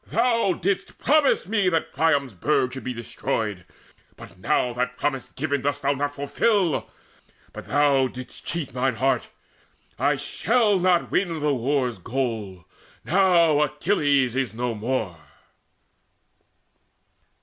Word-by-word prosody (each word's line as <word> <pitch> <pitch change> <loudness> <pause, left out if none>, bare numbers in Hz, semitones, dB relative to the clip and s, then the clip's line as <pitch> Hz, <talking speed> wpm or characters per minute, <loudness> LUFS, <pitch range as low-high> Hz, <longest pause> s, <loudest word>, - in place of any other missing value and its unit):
Thou 230 -4 +2
didst 190 +3 -2
promise 300 -7 +2
me 205 -3 +2
That 165 -2 -1
Priam's 145 -6 +1
burg 125 - 0
should 130 - -7
be 130 - -3
destroyed; 110 -5 -3 0.5
but 90 - -14
now 120 +5 +1
That 125 +1 -2
promise 135 -3 -2
given 140 -1 -2
dost 145 +1 -2
thou 140 - +2
not 145 +1 -3
fulfil, 170 +4 0 0.6
But - - -9
thou 140 -2 +3
didst 130 0 -9
cheat 170 -5 -3
mine 130 0 0
heart: 135 +4 0 0.7
I 145 +3 +2
shall 210 - +1
not 180 -1 +2
win 170 -4 0
The 150 -1 +1
war's 125 -3 -1
goal, 110 -6 -4 0.4
now 170 -4 +4
Achilles 145 - +1
is 130 -6 -1
no 120 0 -2
more." 110 -6 -3
140 Hz, 125 wpm, -24 LUFS, 125-170 Hz, 0.7 s, now